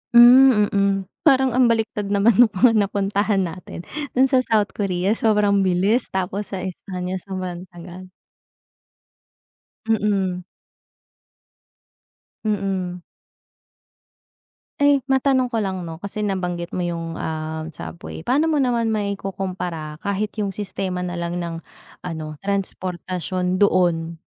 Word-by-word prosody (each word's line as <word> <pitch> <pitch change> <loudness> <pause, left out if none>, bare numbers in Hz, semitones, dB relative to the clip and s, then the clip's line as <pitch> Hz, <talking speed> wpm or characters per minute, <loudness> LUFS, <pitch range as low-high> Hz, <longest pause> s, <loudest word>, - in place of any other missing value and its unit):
Hmm, 240 -3 +8
mm. 200 0 +2 0.3
Parang 265 -2 +5
ang 250 +1 +4
baliktad 220 -3 0
naman 200 +2 +3
nung 245 - +9
mga 230 +6 +5
napuntahan 200 0 +1
natin. 175 0 -7 0.3
Doon 265 +1 +4
sa 260 - +5
South 220 -4 +1
Korea 190 -1 -1
sobrang 210 -3 +2
bilis 190 +5 +2
tapos 190 +2 -3
sa 185 - -4
Espanya 185 0 -5
sobrang 185 -1 -6
tagal. 180 +1 -11 1.8
Mm. 195 -4 0 2.0
Mm. 190 -4 -2 1.7
Eh, 285 -1 +4
matanong 265 -1 +3
ko 235 - -2
lang 190 -2 -3
'no? 165 -1 -7
Kasi 205 +1 -4
nabanggit 180 -3 -2
mo 180 - -1
iyong 165 -1 -4
ah, 160 0 -4
subway 170 +1 -8
paano 260 - +2
mo 300 - +2
naman 235 -3 +1
maikukumpara 190 -6 -4
kahit 200 +1 -1
iyong 205 -2 -1
sistema 190 -2 -3
nalang 175 -1 -3
ng 170 -1 -4 0.5
ano 155 -3 -5
transportasyon 185 -1 -2
doon 170 -4 +2
195 Hz, 115 wpm, -22 LUFS, 180-215 Hz, 2.0 s, nung